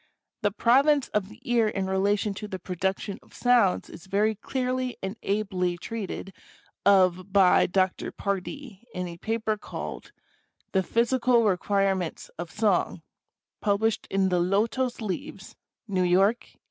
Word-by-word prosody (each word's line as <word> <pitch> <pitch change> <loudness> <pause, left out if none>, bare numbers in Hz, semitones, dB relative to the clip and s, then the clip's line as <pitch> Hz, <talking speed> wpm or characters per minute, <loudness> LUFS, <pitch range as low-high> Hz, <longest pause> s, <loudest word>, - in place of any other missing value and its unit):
The 205 - +2
province 270 +7 +3
of 205 -2 -1
the 220 +2 -14
ear 240 -3 +2
in 195 -2 -2
relation 200 +2 +1
to 210 +2 -7
the 190 - -5
production 190 +3 -3
of - - -20
sounds 240 -7 +3
is 170 +3 -12
very 210 +3 +2
clearly 255 +2 -2
and 190 +2 -3
ably 190 -3 -1
treated 195 -1 -6 0.5
of 185 -1 +4
by 190 -2 +5
Dr. 185 0 0
Pardee, 200 - -5
in 180 0 -2
a 170 -1 -8
paper 220 +2 -1
called - - -7 0.6
"The 190 - +2
Physical 235 +3 +2
Requirements 195 -3 0
of 175 -1 -4
Song," 210 +2 0 0.6
published 210 +1 +1
in 195 -1 +2
the 180 -1 +2
Lotos 225 +8 0
Leaves, 195 -1 -5 0.3
New 190 -3 0
York, 190 +6 +3
1875. - - -46
200 Hz, 140 wpm, -26 LUFS, 190-225 Hz, 0.6 s, by